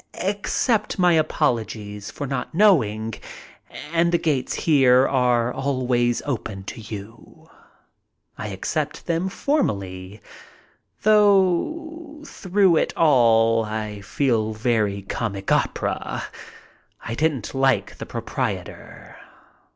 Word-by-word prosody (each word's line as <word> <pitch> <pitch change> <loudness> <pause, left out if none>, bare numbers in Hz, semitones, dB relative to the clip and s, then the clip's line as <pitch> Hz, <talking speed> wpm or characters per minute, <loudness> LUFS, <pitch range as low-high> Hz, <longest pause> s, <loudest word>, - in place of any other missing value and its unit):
Accept 205 +3 0
my 180 -2 +4
apologies 110 -10 -1
for 145 - -6
not 135 +1 -4
knowing, 115 - +3 0.8
and 170 +1 +3
the 170 - +3
gates 150 -7 -1
here 135 -4 +4
are 125 -2 +1
always 125 -3 0
open 110 -8 -4
to 115 +4 -8
you." 110 +1 -10 0.9
I 105 - -6
accept 145 - -3
them 170 +2 -1
formally, 100 - -2 0.8
though 215 - +2
through 190 -3 +2
it - - -1
all 115 -6 +4
I 105 -1 -5
feel 110 -1 0
very 105 -3 0
comic 100 -1 -4
opera. - - -1 0.8
I 115 - -4
didn't 145 -3 -1
like 135 -1 +1
the - - -6
proprietor. - - -5
130 Hz, 100 wpm, -23 LUFS, 110-170 Hz, 0.9 s, my